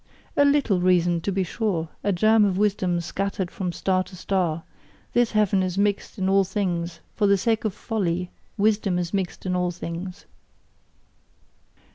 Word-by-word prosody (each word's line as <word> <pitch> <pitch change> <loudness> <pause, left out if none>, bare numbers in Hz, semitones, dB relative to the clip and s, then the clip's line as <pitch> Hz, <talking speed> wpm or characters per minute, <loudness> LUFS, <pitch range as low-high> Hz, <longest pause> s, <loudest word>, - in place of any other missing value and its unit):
A 285 - +5
LITTLE 280 -10 +3
reason, 175 -2 +3
to 200 - -1
be 190 0 0
sure, 180 -4 -2
a 205 - +2
germ 215 +4 +4
of 195 -2 +1
wisdom 190 -4 +1
scattered 190 +1 -3
from 190 -6 -3
star 185 +1 0
to 185 - -12
star 175 -3 -1 0.5
this 240 -2 +2
leaven 205 -2 +3
is 185 0 -2
mixed 200 +2 0
in 190 -1 0
all 195 0 +4
things: 175 -3 -2
for 210 - +2
the 200 0 +5
sake 225 +2 0
of 215 - 0
folly, 180 -5 -2 0.3
wisdom 205 -3 +2
is 175 0 -3
mixed 195 -2 -2
in 180 -1 0
all 180 0 +1
things! 175 +2 -6
190 Hz, 165 wpm, -24 LUFS, 180-205 Hz, 0.5 s, A